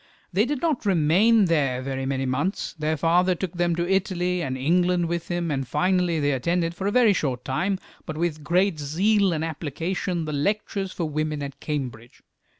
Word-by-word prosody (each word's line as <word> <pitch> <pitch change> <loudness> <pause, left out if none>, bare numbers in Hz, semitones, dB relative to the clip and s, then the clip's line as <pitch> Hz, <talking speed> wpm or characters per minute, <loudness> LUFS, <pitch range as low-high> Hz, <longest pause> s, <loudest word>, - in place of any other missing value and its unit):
They 205 +5 +3
did 285 +2 -3
not 310 -8 +1
remain 195 +4 +4
there 145 -7 +1
very 135 0 -3
many 135 0 -1
months; 150 +10 -1
their 155 -1 -1
father 175 +4 +3
took 180 0 -4
them 175 -1 +1
to 170 +1 -1
Italy 180 -2 0
and 130 -5 -2
England 175 +5 +2
with 170 0 -3
him, 175 -2 -2
and 135 -2 -2
finally 180 +3 +1
they 145 -1 +1
attended 165 +6 0
for 190 +3 -3
a 225 0 +4
short 130 -8 -2
time, 185 +9 0 0.3
but 155 - -5
with 160 -2 -2
great 175 +1 +2
zeal 190 +7 +2
and 160 -1 -1
application, 165 +3 -3
the 155 - -4
lectures 195 +4 -1
for 170 - -3
women 155 -1 -2
at 140 -1 -7
Cambridge. 125 -6 -5
170 Hz, 180 wpm, -24 LUFS, 150-185 Hz, 0.3 s, remain